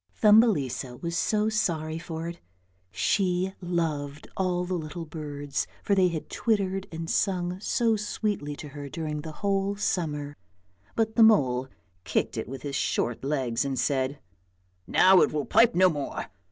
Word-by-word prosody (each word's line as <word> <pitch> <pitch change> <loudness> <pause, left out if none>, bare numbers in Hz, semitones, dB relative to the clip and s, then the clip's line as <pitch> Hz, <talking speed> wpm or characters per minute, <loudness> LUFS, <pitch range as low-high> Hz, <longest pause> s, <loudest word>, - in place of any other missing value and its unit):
Thumbelisa 175 - +3
was 170 -1 -3
so 210 +3 +1
sorry 165 -7 -1
for 165 -1 -5
it; 170 0 -7 0.5
she 185 - +1
loved 155 -5 -2
all 180 -1 0
the 185 - -3
little 165 0 -4
birds, 145 -2 -4 0.2
for 205 - +1
they 190 -2 +5
had 165 -3 -4
twittered 195 -3 0
and 165 0 -5
sung 180 -1 0
so 225 +2 +1
sweetly 205 -7 -2
to 150 - -9
her 145 0 -8
during 150 0 -4
the 160 +1 -7
whole 195 0 +1
summer; 150 -7 -2 0.6
but 220 0 0
the - - +6
mole 135 - +5 0.4
kicked - - -1
it - - -4
with 135 -1 -7
his 140 -2 -4
short 120 -3 -1
legs 130 -4 0
and 135 -1 -2
said, 135 +1 0 0.4
" 90 +1 -41 0.2
Now 185 0 +6
it - - +3
will 150 -2 -1
pipe 235 +1 +4
no 185 +1 +6
more! 145 -5 -3
165 Hz, 160 wpm, -27 LUFS, 145-195 Hz, 0.6 s, the